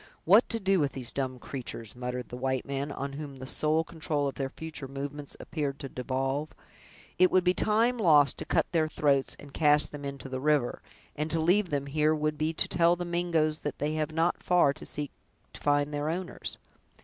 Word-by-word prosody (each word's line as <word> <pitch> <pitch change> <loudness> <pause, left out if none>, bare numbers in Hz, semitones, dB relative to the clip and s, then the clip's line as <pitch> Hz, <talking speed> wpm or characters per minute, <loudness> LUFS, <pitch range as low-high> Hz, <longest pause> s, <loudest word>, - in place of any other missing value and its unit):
"What 205 +8 +6
to 230 - 0
do 195 -2 +2
with 145 -3 +1
these 125 -4 -2
dumb 130 -1 -2
creatures!" 120 -3 -7
muttered 125 0 -4
the - - -6
white 130 0 -1
man, 140 +1 -3
on 140 0 -4
whom 140 -1 -7
the 130 - -7
sole 155 +4 +1
control 155 -3 -1
of 135 - -3
their 135 -1 -3
future 150 -2 -6
movements 140 +1 -6
appeared 145 -4 -3
to 135 - -7
devolve; 135 +4 -2 0.7
"it 185 0 +7
would 185 - +3
be 180 0 +4
time 230 +5 +2
lost 150 -8 +5
to - - -5
cut - - +2
their 160 -2 +2
throats, 140 -3 +1
and 140 -1 -12
cast 150 -1 +3
them 145 -1 -8
into 140 -1 -6
the 130 -1 -4
river; 145 -3 +1 0.3
and 150 +2 -2
to 165 - +1
leave 180 +4 +3
them 140 -1 -1
here 155 +2 +2
would 150 0 -1
be 155 +1 +1
to 165 - +1
tell 170 0 +4
the 175 0 -4
Mingoes 170 -3 +1
that 145 -2 -4
they 150 +2 -1
have 155 0 -1
not 165 +2 +1
far 175 -6 +4
to 155 - -9
seek 145 -1 -4 0.4
to - - -10
find 145 0 +2
their 145 +1 -1
owners!" 175 +2 -4
150 Hz, 210 wpm, -29 LUFS, 140-160 Hz, 0.7 s, it